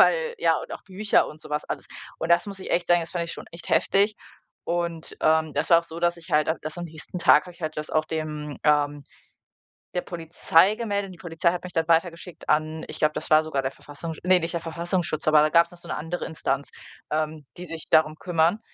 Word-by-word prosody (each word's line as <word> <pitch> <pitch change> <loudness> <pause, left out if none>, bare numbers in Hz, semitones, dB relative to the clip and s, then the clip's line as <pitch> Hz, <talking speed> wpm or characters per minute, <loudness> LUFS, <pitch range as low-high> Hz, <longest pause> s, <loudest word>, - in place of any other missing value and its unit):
weil, 485 -1 +4
ja 445 - +3
und - - -8
auch - - -7
Bücher 200 +2 +2
und 150 - -11
so - - -10
was 150 0 -1
alles. - - -5 0.3
Und 165 - -3
das 170 +4 +4
muss 200 -1 -7
ich - - -7
echt 175 0 +1
sagen, 175 0 +5
das 165 - -6
fand 170 -1 -1
ich 170 - -5
schon - - -8
echt 170 +1 -9
heftig 200 +2 +3 0.5
und, 170 -1 -3
ähm, 160 0 +3
das 150 - 0
war 170 -1 +8
auch - - -14
so, 170 0 -8
dass 175 0 +2
ich 165 -2 -12
halt 150 +1 +3
dass 155 +3 -5
am 175 - -4
nächsten 160 +2 -7
Tag 150 -3 +6
habe 180 - -10
ich 175 - -16
halt 155 0 -3
das 150 0 -4
auch 155 0 +2
dem 155 -2 -4
ähm, 145 -1 +2 0.9
der 180 - +1
Polizei 170 +3 +3
gemeldet 205 -4 -2
und 185 - -10
die 175 - -14
Polizei 170 0 0
hat 180 - -5
mich 180 - -7
dann 160 0 +1
weitergeschickt 170 +1 0
an 155 +1 +1
ich - - -6
glaube, 155 0 +3
das - - -4
war 155 0 +7
sogar 150 -3 -1
der 135 - -2
Verfassungs 155 +4 -8
ne, 185 0 +5
nicht 165 +1 -3
der 170 - -1
Verfassungsschutz, 170 -1 -1
aber 155 -1 +6
da 155 - +2
gab's 170 +1 +5
noch - - -12
so - - -12
’ne - - -2
andere 165 +4 -4
Instanz, 140 -3 -2 0.4
ähm, 155 -1 -2
die 180 - -7
sich 165 -1 -7
darum 155 -1 +4
kümmern 175 +4 +1
165 Hz, 245 wpm, -25 LUFS, 155-175 Hz, 0.9 s, war